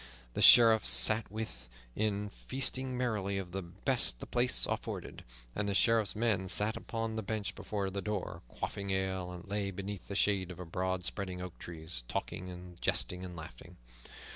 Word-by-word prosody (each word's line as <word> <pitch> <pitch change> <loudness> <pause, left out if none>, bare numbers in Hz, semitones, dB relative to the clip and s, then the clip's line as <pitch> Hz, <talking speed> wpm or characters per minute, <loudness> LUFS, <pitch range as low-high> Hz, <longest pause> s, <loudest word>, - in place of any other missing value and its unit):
The - - -2
Sheriff 115 -2 +8
sat 110 0 +7
within, 100 - -5
feasting 130 +2 0
merrily 105 -6 -1
of 95 -2 -5
the 95 +2 -3
best 95 - +1
the - - -8
place 125 0 +2
afforded, - - -5 0.3
and 100 - -1
the 100 - -1
Sheriff's 115 -1 +2
men 105 -4 +1
sat 105 +4 +4
upon 115 -1 -4
the - - -1
bench 105 0 -3
before 100 -2 -4
the 100 +1 -3
door, 105 -1 -4
quaffing 100 +9 -5
ale, 95 -1 -1
or 90 -1 -8
lay 100 0 -2
beneath 100 0 -6
the 100 - -6
shade 95 -3 +1
of 90 - -8
the 90 - -7
broad 90 +1 -2
spreading 90 +1 -4
oak 90 -1 -8
trees, 80 -5 -6
talking 90 +8 -4
and 90 -1 -11
jesting 90 +1 0
and 90 -1 -7
laughing. 85 +1 -11
100 Hz, 170 wpm, -32 LUFS, 90-110 Hz, 0.3 s, Sheriff